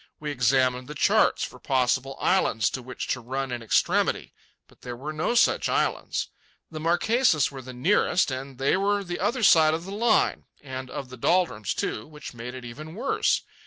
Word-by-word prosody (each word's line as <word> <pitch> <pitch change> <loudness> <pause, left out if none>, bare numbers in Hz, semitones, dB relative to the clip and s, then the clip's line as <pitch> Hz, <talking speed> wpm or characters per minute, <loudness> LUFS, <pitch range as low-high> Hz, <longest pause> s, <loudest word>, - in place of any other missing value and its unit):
We 150 -1 -4
examined 125 -1 +1
the 150 - -8
charts - - +3
for - - -7
possible 135 +1 0
islands 115 - +2
to 130 - -4
which 125 +1 -6
to 125 - 0
run 130 +2 -4
in 120 -1 -4
extremity, 115 - +1 0.3
but - - -24
there 125 -1 -6
were 145 +5 -6
no 155 +10 -1
such 235 - +3
islands. - - -1 0.4
The 155 - -6
Marquesas 175 - +2
were 135 -1 -8
the 130 0 -9
nearest, 155 +5 +2
and 130 0 -6
they 135 +5 +2
were 200 +1 +1
the 175 -2 -5
other 230 +5 -1
side 160 -5 +6
of 165 +2 -6
the 195 - -7
Line, 220 +2 +1 0.2
and 130 -2 -7
of 130 0 -6
the 130 - -10
doldrums, 160 - +1
too, 105 - -3
which 150 -3 -10
made 120 +2 -7
it 125 -1 -8
even 155 +7 -9
worse. 255 +6 0
135 Hz, 190 wpm, -26 LUFS, 125-175 Hz, 0.4 s, side